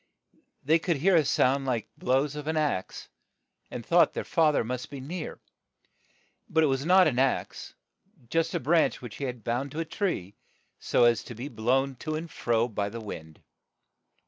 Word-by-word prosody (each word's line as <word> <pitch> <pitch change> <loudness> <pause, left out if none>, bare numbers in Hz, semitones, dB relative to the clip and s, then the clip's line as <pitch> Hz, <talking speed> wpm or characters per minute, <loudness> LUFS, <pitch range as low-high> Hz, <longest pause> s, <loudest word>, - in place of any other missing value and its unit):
They 160 +4 +4
could 170 -2 0
hear 185 +6 +3
a 160 - +5
sound 135 0 +2
like 120 -4 -1
blows 135 +3 0
of 150 0 -6
an 160 0 0
axe, 145 -12 -2 0.6
and - - -7
thought - - +4
their - - -2
fa 160 -2 +3
ther 145 - +1
must 125 +2 -4
be 140 - -7
near; 155 +5 -6 1.1
but 160 0 +3
it - - +5
was 135 -2 0
not 185 +1 +7
an 130 -5 +1
axe, 135 0 -1 0.6
but 165 0 +1
a - - +1
branch 160 +5 +2
which 120 -3 -8
he 140 - -3
had 125 -4 -5
bound 120 +5 -2
to 155 - -4
a 165 - -1
tree, 160 - -2 0.5
so - - +2
as 120 -2 +4
to 120 - -8
be 125 +6 -6
blown 130 +3 0
to 155 +5 -4
and 165 +1 -5
fro 115 0 +1
by 100 -3 -2
the 115 - -7
wind. 80 -7 -9
135 Hz, 190 wpm, -28 LUFS, 120-160 Hz, 1.1 s, not